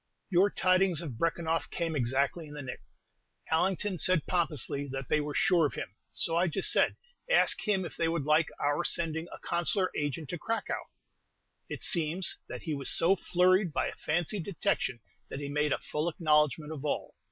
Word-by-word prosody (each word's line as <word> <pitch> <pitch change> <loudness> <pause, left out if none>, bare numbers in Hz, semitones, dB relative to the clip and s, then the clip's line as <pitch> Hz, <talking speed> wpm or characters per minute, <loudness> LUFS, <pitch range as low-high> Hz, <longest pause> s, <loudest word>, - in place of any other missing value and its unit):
Your 190 +3 +4
tidings 185 -3 +2
of 135 -9 -7
Brekenoff 165 0 -1
came 165 -2 -2
exactly 140 +5 0
in 150 - -10
the 145 - -6
nick. 125 - -7 0.7
Allington 185 +3 +1
said 185 -5 +4
pompously 150 -5 0
that 135 -1 -6
they 150 - +2
were 145 0 -5
sure 180 -8 +3
of - - -9
him; - - -6 0.2
so 165 - +1
I 175 +2 +3
just 180 +4 +2
said, - - +3 0.3
"Ask - - +3
him 195 -3 +1
if - - -8
they 165 - +1
would 165 -2 -1
like 155 +1 +3
our 145 +3 0
sending 165 -1 -1
a - - -8
Consular 180 +2 0
Agent 145 +1 -3
to 175 - -4
Cracow?" 225 +7 -3 0.8
It - - -5
seems 170 +2 +1
that - - -7
he 160 - -3
was 140 -2 0
so 175 +4 +5
flurried 185 0 +2
by - - 0
a - - -9
fancied 175 +4 -2
detection 150 - -1 0.3
that 135 - -6
he 140 -1 -5
made 150 +1 0
a - - +2
full 150 +3 -2
acknowledgment 150 -2 +1
of 150 -3 -6
all. 150 - -2
165 Hz, 185 wpm, -30 LUFS, 150-180 Hz, 0.8 s, so